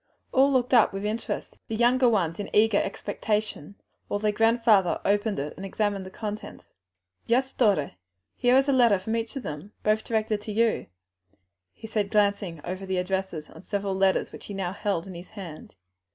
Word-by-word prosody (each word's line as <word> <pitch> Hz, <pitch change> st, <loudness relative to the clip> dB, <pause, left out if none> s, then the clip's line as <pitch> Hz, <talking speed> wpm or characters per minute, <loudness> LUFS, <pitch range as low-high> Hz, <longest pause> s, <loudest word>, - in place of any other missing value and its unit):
All 270 Hz, +2 st, +4 dB
looked 255 Hz, -1 st, +1 dB
on 235 Hz, -3 st, +6 dB
with 195 Hz, +1 st, -4 dB
interest, 220 Hz, +2 st, -4 dB
the 225 Hz, -, -3 dB
younger 245 Hz, +2 st, +4 dB
ones 175 Hz, -7 st, 0 dB
in 205 Hz, -, -4 dB
eager 215 Hz, -1 st, +5 dB
expectation, 210 Hz, -3 st, -3 dB, 0.3 s
while 205 Hz, -, -1 dB
their 210 Hz, 0 st, +1 dB
grandfather 225 Hz, -4 st, +3 dB
opened 205 Hz, +1 st, +1 dB
it 145 Hz, +2 st, -3 dB
and 190 Hz, -, -9 dB
examined 195 Hz, -1 st, -1 dB
the -, -, -7 dB
contents. 210 Hz, +2 st, -7 dB, 0.5 s
"Yes, 260 Hz, +3 st, +1 dB
daughter, 200 Hz, -, +2 dB, 0.5 s
there 245 Hz, +1 st, +5 dB
is 270 Hz, +1 st, +3 dB
a 280 Hz, -, +3 dB
letter 235 Hz, -6 st, +5 dB
from 220 Hz, +5 st, -3 dB
each 230 Hz, +3 st, -3 dB
of 270 Hz, -, -4 dB
them, 155 Hz, +8 st, -7 dB
both 215 Hz, +1 st, +2 dB
directed 220 Hz, -2 st, -1 dB
to 210 Hz, -, -6 dB
you," 225 Hz, +2 st, +1 dB, 0.8 s
he -, -, -12 dB
said, 215 Hz, -2 st, -1 dB
glancing 200 Hz, -6 st, +1 dB
over 185 Hz, +2 st, -5 dB
the 190 Hz, -1 st, -1 dB
addresses 180 Hz, -4 st, -2 dB
on -, -, -12 dB
several 200 Hz, 0 st, -2 dB
letters 190 Hz, 0 st, +2 dB
which -, -, -11 dB
he 205 Hz, -, -6 dB
now 190 Hz, -2 st, -2 dB
held 200 Hz, -5 st, -2 dB
in 190 Hz, -, -8 dB
his 175 Hz, +1 st, -10 dB
hand. 180 Hz, -7 st, -10 dB
205 Hz, 185 wpm, -26 LUFS, 190-225 Hz, 0.8 s, on